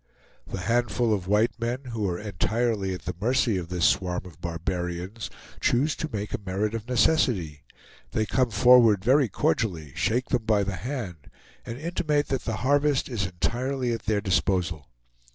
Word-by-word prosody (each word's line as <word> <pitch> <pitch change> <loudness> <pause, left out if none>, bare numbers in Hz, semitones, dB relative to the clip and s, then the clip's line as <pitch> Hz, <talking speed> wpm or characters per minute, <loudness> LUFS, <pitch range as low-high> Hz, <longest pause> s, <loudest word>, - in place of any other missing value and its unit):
The 95 - -5
handful 120 +1 +1
of 95 -3 -2
white 105 +4 +2
men, 120 +3 -2
who 110 -4 -1
are 85 - -2
entirely 105 +2 -1
at 90 - -10
the - - -3
mercy 120 -1 +2
of 85 -2 -5
this 90 -2 +1
swarm 90 -2 +1
of 85 -2 -13
barbarians, 90 +4 -4 0.3
choose 145 +6 +2
to 155 - -3
make 105 -1 -4
a - - -1
merit 100 +3 -1
of 115 -1 -5
necessity; 115 - +1 0.4
they 110 - 0
come 130 +3 +1
forward 115 -3 +5
very 130 0 +4
cordially, 80 - -1
shake 110 +9 0
them 120 -3 0
by 105 -2 +3
the 100 -1 -3
hand, 105 - -6 0.4
and 115 - -5
intimate 150 -1 -1
that 135 - -2
the 115 - -1
harvest 145 0 +2
is 105 -7 -1
entirely 120 +9 -1
at 115 - -5
their 105 -2 +2
disposal. 90 -5 0
110 Hz, 170 wpm, -26 LUFS, 90-125 Hz, 0.4 s, forward